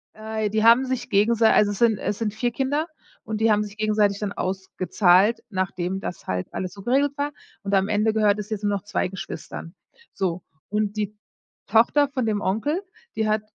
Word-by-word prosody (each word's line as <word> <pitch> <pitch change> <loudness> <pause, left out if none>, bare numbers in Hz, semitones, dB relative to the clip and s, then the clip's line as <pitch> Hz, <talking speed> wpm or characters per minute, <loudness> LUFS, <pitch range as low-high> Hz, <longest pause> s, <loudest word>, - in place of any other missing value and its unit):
Äh, 220 -1 -3
die 215 +1 0
haben 235 +3 +6
sich 255 -1 -3
gegensei 220 +2 +4
also 205 -1 +4
es 200 - -5
sind 230 -3 +4
es 205 - -2
sind 215 -2 -1
4 240 +2 -1
Kinder 285 +6 -1 0.4
und 220 0 -4
die 225 -1 +4
haben 210 0 +3
sich 205 +1 -9
gegenseitig 210 -2 +2
dann 205 -1 -2
ausgezahlt, 190 +2 +2
nachdem 185 -1 -2
das 180 - -6
halt 90 -1 -2
alles 185 -1 -4
so 200 -1 -11
geregelt 280 +3 +2
war. 290 +1 -1 0.3
Und 200 0 -3
am 195 0 +3
Ende 215 +1 +2
gehört 210 -1 +3
es 210 +1 -6
jetzt 215 -1 -4
nur 205 0 +1
noch 185 - -11
2 205 - -1
Geschwistern. 175 -2 -7 0.4
So, 185 -2 -2 0.3
und 210 0 -1
die 210 0 -3 0.5
Tochter 235 +7 +4
von 260 -4 -2
dem 210 -2 0
Onkel, 290 - 0 0.3
die 220 -1 0
hat 215 0 +1
210 Hz, 200 wpm, -24 LUFS, 195-225 Hz, 0.5 s, haben